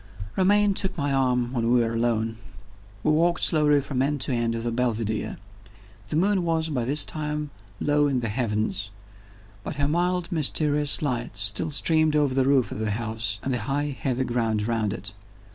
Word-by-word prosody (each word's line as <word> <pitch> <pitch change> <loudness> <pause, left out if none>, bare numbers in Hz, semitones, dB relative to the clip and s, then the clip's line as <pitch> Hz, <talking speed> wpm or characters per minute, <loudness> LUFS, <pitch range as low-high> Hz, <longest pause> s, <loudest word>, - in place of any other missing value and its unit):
Romayne 205 +2 +3
took 190 -1 -2
my 145 -2 0
arm 125 -2 +1
when 115 -2 0
we 125 - +5
were 115 0 -1
alone 115 -1 0 0.7
we 155 - +3
walked 170 +3 +2
slowly 150 -3 +5
from 130 -2 -2
end 145 +2 0
to 130 - 0
end 115 -1 0
of 115 - -4
the 120 - -1
Belvidere. 115 -3 -2 0.7
The - - -2
moon 190 +3 +2
was, 165 -1 0
by 125 -6 -1
this 145 +5 +4
time, 150 -1 -4 0.3
low 145 0 +2
in 135 -3 0
the 115 - -2
heavens; 105 -2 -2 0.7
but - - -5
her 140 0 0
mild 175 +2 0
mysterious 150 -2 +2
light 120 -6 -2
still 100 +10 +1
streamed 155 +1 +2
over 145 -3 +2
the 130 0 +2
roof 135 -2 +2
of - - -5
the 110 -1 -1
house 110 -1 -2
and 135 - -1
the 125 - -1
high 145 0 -1
heathy 130 -1 -1
ground 115 -4 -1
round 110 -3 0
it. 100 -1 -5
130 Hz, 185 wpm, -25 LUFS, 115-150 Hz, 0.7 s, we